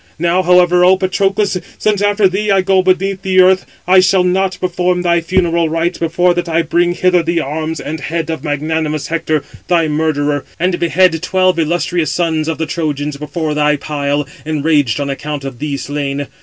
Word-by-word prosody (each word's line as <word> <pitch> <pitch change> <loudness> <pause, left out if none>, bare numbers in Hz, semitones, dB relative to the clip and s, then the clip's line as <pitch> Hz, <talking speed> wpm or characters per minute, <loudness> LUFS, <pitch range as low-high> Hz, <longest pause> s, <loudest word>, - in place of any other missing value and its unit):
Now, 175 +3 +1
however, 180 0 +4
O 185 +1 +5
Patroclus! 195 +1 0 0.2
since 210 -2 0
after 205 0 +3
thee 200 +3 -2
I 195 -1 +4
go 190 0 +3
beneath 190 +1 0
the 190 -1 +1
earth, 185 0 +4 0.2
I 185 +1 +6
shall 185 0 +3
not 185 +1 0
perform 180 0 -1
thy 170 -1 +2
funeral 170 -1 +1
rites, 165 +2 -1
before 175 +2 +1
that 175 0 -3
I 165 +1 +1
bring 175 +2 +1
hither 180 -1 +2
the 170 +1 -1
arms 155 +3 -3
and 155 +1 -5
head 165 +3 -3
of 160 -3 -5
magnanimous 155 0 -2
Hector, 155 -3 -1 0.2
thy 170 -2 +2
murderer, 150 -2 -1 0.2
and 180 +1 0
behead 170 0 +2
twelve 185 -2 +1
illustrious 170 -1 0
sons 160 -2 -1
of 165 -2 -2
the 160 - -2
Trojans, 150 -3 -3
before 150 +1 -3
thy 150 0 +2
pile, 145 -1 -2 0.2
enraged 150 -5 0
on 140 - -2
account 145 +1 -5
of 135 -3 -7
thee 145 -2 -3
slain. 140 0 -3
170 Hz, 185 wpm, -15 LUFS, 150-185 Hz, 0.2 s, I